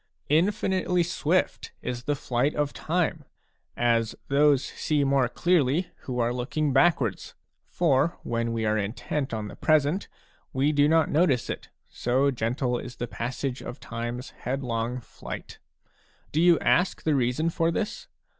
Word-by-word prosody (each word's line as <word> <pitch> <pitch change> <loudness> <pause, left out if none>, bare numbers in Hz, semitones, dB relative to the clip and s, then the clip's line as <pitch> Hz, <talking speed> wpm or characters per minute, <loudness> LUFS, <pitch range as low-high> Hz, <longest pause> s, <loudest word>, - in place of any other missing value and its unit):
Infinitely 180 +2 +2
swift 175 +1 0
is 125 -1 -4
the 145 - +1
flight 135 +1 0
of 145 -1 0
time, 165 -2 -1 0.5
as 115 -2 +2
those 140 -1 +4
see 150 -2 0
more 135 -3 +2
clearly 170 +2 +1
who 125 -2 -3
are 120 0 +1
looking 135 +4 -1
backwards. 135 - +2 0.3
For 160 -1 +2
when 115 0 -1
we 115 -1 -1
are 110 0 +2
intent 125 +7 -3
on 110 -2 -3
the - - -9
present, 155 +4 +2 0.5
we 135 +3 +2
do 145 -1 +4
not 160 -1 +3
notice 145 -6 +2
it, - - -7 0.2
so 130 +3 +1
gentle 125 +1 -1
is 125 -1 -8
the 120 - -3
passage 125 +3 -4
of 130 - -7
time's 120 +2 -5
headlong 125 -2 -3
flight. - - -9 0.7
Do 155 - +1
you 175 -1 +6
ask 180 +2 +2
the 155 - +2
reason 135 +5 +1
for 165 0 +1
this? 210 +5 -3
135 Hz, 145 wpm, -26 LUFS, 120-155 Hz, 0.7 s, you